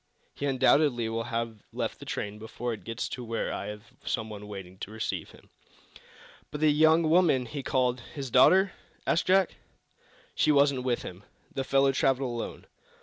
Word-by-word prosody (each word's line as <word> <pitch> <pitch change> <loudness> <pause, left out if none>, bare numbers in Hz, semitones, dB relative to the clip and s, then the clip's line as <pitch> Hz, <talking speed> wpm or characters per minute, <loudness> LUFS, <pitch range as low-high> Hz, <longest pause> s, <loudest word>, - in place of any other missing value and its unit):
He 145 - -3
undoubtedly 130 -2 +3
will 115 0 -2
have 115 -2 -3
left - - -3
the - - -11
train 105 +1 -4
before 115 +2 -4
it 110 - -9
gets 115 0 -4
to 125 - -6
where 115 -1 -2
I - - -4
have 105 0 -7 0.2
some 110 0 -2
one 105 -1 -8
waiting 95 -2 -9
to - - -6
receive 110 0 -4
him." - - -18 1.0
"But 150 - -6
the 155 0 +4
young 160 +2 +4
woman 155 -6 +4
he 140 +4 -5
called 125 -2 +1 0.2
his 135 -4 -5
daughter?" 185 - +6 0.3
asked - - +1
Jack 190 -1 +3 0.8
"She - - +3
wasn't 140 -2 +4
with 125 -2 -1
him. 90 +2 -9 0.3
The 135 - -2
fellow 135 +1 +3
traveled 135 -1 +1
alone. 120 -1 -5
125 Hz, 175 wpm, -28 LUFS, 115-145 Hz, 1.0 s, daughter